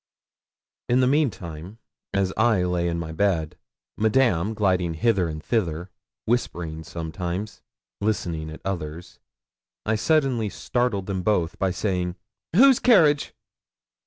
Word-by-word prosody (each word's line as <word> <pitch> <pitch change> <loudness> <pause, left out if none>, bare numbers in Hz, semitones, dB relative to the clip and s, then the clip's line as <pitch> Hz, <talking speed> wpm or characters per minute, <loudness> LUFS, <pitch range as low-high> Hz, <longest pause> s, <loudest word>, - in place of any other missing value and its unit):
In 125 +1 +4
the - - +4
meantime, 105 - -1 0.3
as 95 -1 0
I 110 -4 +3
lay 90 -1 0
in 85 0 -1
my 80 -1 -4
bed, 80 -3 0 0.4
Madame, 110 -3 +2
gliding 90 -5 +1
hither 95 0 +2
and 80 -1 -6
thither, 90 -5 -1 0.3
whispering 85 -9 -2
sometimes, 90 +5 -5 0.4
listening 85 -7 -2
at 80 - -10
others, 85 -3 -5 0.7
I 110 - +1
suddenly 120 -1 +1
startled 120 -3 -1
them 95 -1 -2
both 90 -3 0
by 95 - +2
saying 90 -1 -1 0.4
'Whose 265 +4 +7
carriage?' 155 - +4
95 Hz, 120 wpm, -24 LUFS, 85-110 Hz, 0.7 s, Whose